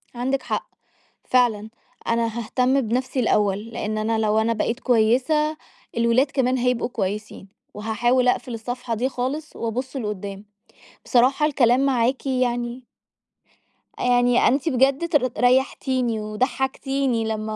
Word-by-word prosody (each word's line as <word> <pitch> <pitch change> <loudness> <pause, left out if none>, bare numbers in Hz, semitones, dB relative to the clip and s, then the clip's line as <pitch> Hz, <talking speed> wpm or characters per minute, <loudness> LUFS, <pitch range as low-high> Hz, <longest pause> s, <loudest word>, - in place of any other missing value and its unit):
عندِك 260 +3 -1
حق. - - -3 0.5
فعلًا، 225 -4 +1 0.4
أنا 230 0 +1
هاهتم 250 +4 +1
بنفسي 255 +3 -2
الأوّل، 205 -3 +1
لإن 215 -1 -3
أنا 220 +1 0
لو 215 0 +2
أنا 225 +1 +1
بقيت 230 +2 -2
كويّسة، 260 +7 +2 0.4
الولاد 235 +4 +2
كمان 260 -2 +1
هيبقوا 250 -1 0
كويسين. 205 -2 -4 0.3
وهاحاول 240 +4 +1
أقفل 250 0 0
الصفحة 245 +1 -4
دي 250 +4 -1
خالص، 275 +5 -4
وأبُص 250 +4 -4
لقُدّام. 205 -3 -5 0.6
بصراحة، 260 +4 +3
الكلام 265 -2 +3
معاكِ 255 0 0
يعني 245 -1 -1 1.2
يعني 245 0 +3
أنتِ 275 +5 +1
بجد 275 +5 +2
تر 280 -7 +2
رَيحتيني 255 -2 +1
وضَحكتيني 260 +2 -1
لمّا 215 0 -3
245 Hz, 120 wpm, -23 LUFS, 225-260 Hz, 1.2 s, بصراحة